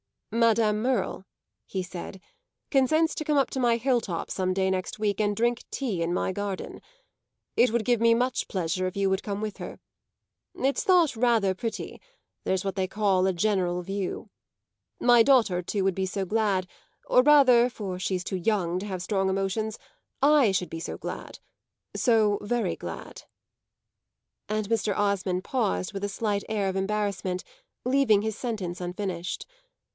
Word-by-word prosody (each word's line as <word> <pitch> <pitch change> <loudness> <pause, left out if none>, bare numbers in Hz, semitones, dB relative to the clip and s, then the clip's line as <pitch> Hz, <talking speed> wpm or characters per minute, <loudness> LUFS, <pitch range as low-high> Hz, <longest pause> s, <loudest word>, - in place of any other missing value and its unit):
"Madame 225 -2 +3
Merle," 235 -6 -1 0.4
he 190 -1 -3
said, 180 +1 -8 0.5
"consents 310 +4 +3
to 310 - -4
come 300 -1 +2
up 275 - +3
to 265 - -3
my 240 -2 +3
hill 245 +1 +2
top 170 -6 -4
some 185 -1 0
day 190 0 +1
next 185 -1 -3
week 210 -1 -1
and 205 -1 +1
drink 235 +2 0
tea 225 -11 -2
in 165 +1 0
my 185 - 0
garden. 200 0 -5 0.8
It 250 - +5
would 235 -1 +1
give 240 0 +2
me 230 0 +5
much 250 +1 0
pleasure 185 0 -1
if 185 - -6
you 200 -1 +1
would 190 - 0
come 205 -1 -3
with 215 -2 -4
her. - - -8 0.8
It's 275 +8 0
thought 345 - +4
rather 225 -5 +3
pretty 220 +4 -5 0.4
there's 190 -1 0
what 195 -1 -3
they 190 -2 0
call 190 -2 +2
a 190 - +1
general 180 -2 0
view. 195 +1 -4 0.7
My 240 -1 +6
daughter 225 -8 +4
too 195 +2 -2
would 195 0 +2
be 190 +1 -1
so 195 +1 -2
glad 205 -2 +1 0.4
or 250 - +5
rather, 255 -4 +6
for 195 -6 -5
she's 185 -1 -1
too 190 0 -3
young 180 -2 0
to 195 - -6
have 185 -3 -4
strong 195 -1 0
emotions, 195 +3 -1 0.4
I 285 -6 +5
should 180 -1 -1
be 165 - -5
so - - -5
glad - - -7 0.6
so 215 -4 +3
very 235 +3 -1
glad." - - -8 1.2
And 215 -1 -2
Mr. 220 -3 0
Osmond 195 -3 0
paused 90 - -1
with 200 0 -4
a - - -3
slight 205 0 -2
air 205 -3 0
of 190 - -3
embarrassment, 195 -2 -1 0.4
leaving 250 -6 +3
his 220 0 -3
sentence 200 -8 -4
unfinished. 180 -1 -4
205 Hz, 170 wpm, -27 LUFS, 190-230 Hz, 1.2 s, My